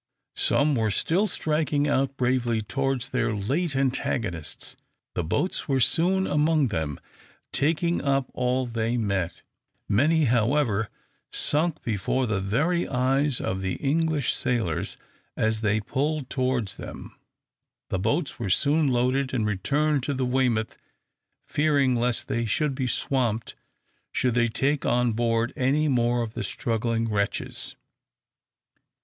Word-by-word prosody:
Some 145 Hz, +1 st, +2 dB
were 110 Hz, -4 st, +1 dB
still 175 Hz, -, +1 dB
striking 150 Hz, -4 st, 0 dB
out 135 Hz, -1 st, 0 dB
bravely 125 Hz, -2 st, +1 dB
towards 135 Hz, +3 st, -2 dB
their 120 Hz, -4 st, 0 dB
late 140 Hz, -, -1 dB
antagonists. 115 Hz, -, -2 dB, 0.4 s
The 90 Hz, -, -1 dB
boats 180 Hz, -, -1 dB
were 135 Hz, -1 st, +2 dB
soon 180 Hz, +8 st, +2 dB
among 150 Hz, -2 st, +2 dB
them, 80 Hz, -7 st, -3 dB, 0.5 s
taking 165 Hz, +3 st, +1 dB
up 135 Hz, -1 st, +1 dB
all 125 Hz, +1 st, 0 dB
they 115 Hz, 0 st, -1 dB
met. 100 Hz, -6 st, -2 dB, 0.4 s
Many, 155 Hz, +10 st, +3 dB
however, 115 Hz, -3 st, +2 dB, 0.4 s
sunk 155 Hz, +2 st, +2 dB
before 115 Hz, +4 st, 0 dB
the 105 Hz, -4 st, -1 dB
very 150 Hz, -, +1 dB
eyes 135 Hz, +1 st, +1 dB
of 95 Hz, 0 st, -2 dB
the 95 Hz, -1 st, -1 dB
English 150 Hz, -3 st, +1 dB
sailors, 110 Hz, -11 st, -1 dB, 0.4 s
as 110 Hz, 0 st, +1 dB
they 105 Hz, 0 st, +2 dB
pulled 140 Hz, +4 st, -2 dB
towards 130 Hz, -6 st, -1 dB
them. -, -, -9 dB, 0.7 s
The 95 Hz, -, -1 dB
boats 140 Hz, -, -1 dB
were 110 Hz, -5 st, -2 dB
soon 150 Hz, -, +3 dB
loaded, 130 Hz, +1 st, +1 dB
and 110 Hz, -4 st, +1 dB
returned 140 Hz, +9 st, +1 dB
to 140 Hz, +2 st, -2 dB
the 130 Hz, 0 st, 0 dB
"Weymouth," 125 Hz, -3 st, 0 dB, 0.7 s
fearing 145 Hz, -4 st, +2 dB
lest 120 Hz, 0 st, 0 dB
they 115 Hz, 0 st, -1 dB
should 150 Hz, +6 st, +1 dB
be 130 Hz, -1 st, -2 dB
swamped 120 Hz, -3 st, 0 dB, 0.6 s
should 125 Hz, -2 st, +1 dB
they 120 Hz, 0 st, +3 dB
take 140 Hz, +5 st, 0 dB
on 125 Hz, -1 st, +2 dB
board 115 Hz, +1 st, 0 dB
any 145 Hz, +3 st, +2 dB
more 120 Hz, -3 st, +2 dB
of 110 Hz, -1 st, -6 dB
the 120 Hz, -, -4 dB
struggling 115 Hz, +3 st, -1 dB
wretches. 100 Hz, -2 st, -2 dB
125 Hz, 130 wpm, -26 LUFS, 115-145 Hz, 0.7 s, Many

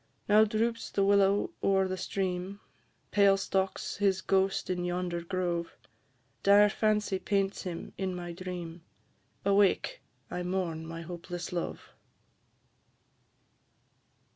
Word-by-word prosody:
Now 215 Hz, +1 st, +6 dB
droops 225 Hz, +2 st, -1 dB
the 200 Hz, -, +1 dB
willow 200 Hz, 0 st, +3 dB
o'er 190 Hz, -1 st, +3 dB
the 185 Hz, -, -2 dB
stream; 185 Hz, +1 st, -3 dB, 0.5 s
Pale 200 Hz, -1 st, +5 dB
stalks 195 Hz, 0 st, -1 dB
his 195 Hz, -2 st, +2 dB
ghost 190 Hz, 0 st, +1 dB
in 180 Hz, -1 st, -1 dB
yonder 175 Hz, -1 st, -2 dB
grove; 175 Hz, -1 st, -2 dB, 0.6 s
Dire 205 Hz, +1 st, +6 dB
fancy 210 Hz, -2 st, +1 dB
paints 195 Hz, -1 st, 0 dB
him 175 Hz, -2 st, -6 dB
in 190 Hz, -1 st, -1 dB
my 175 Hz, -1 st, -5 dB
dream; 175 Hz, -1 st, -6 dB, 0.6 s
Awake, 200 Hz, -, +2 dB, 0.3 s
I 180 Hz, -, -3 dB
mourn 175 Hz, -3 st, -2 dB
my 165 Hz, 0 st, -6 dB
hopeless 175 Hz, +1 st, -6 dB
love. 175 Hz, -, -4 dB
190 Hz, 115 wpm, -30 LUFS, 175-200 Hz, 0.6 s, Now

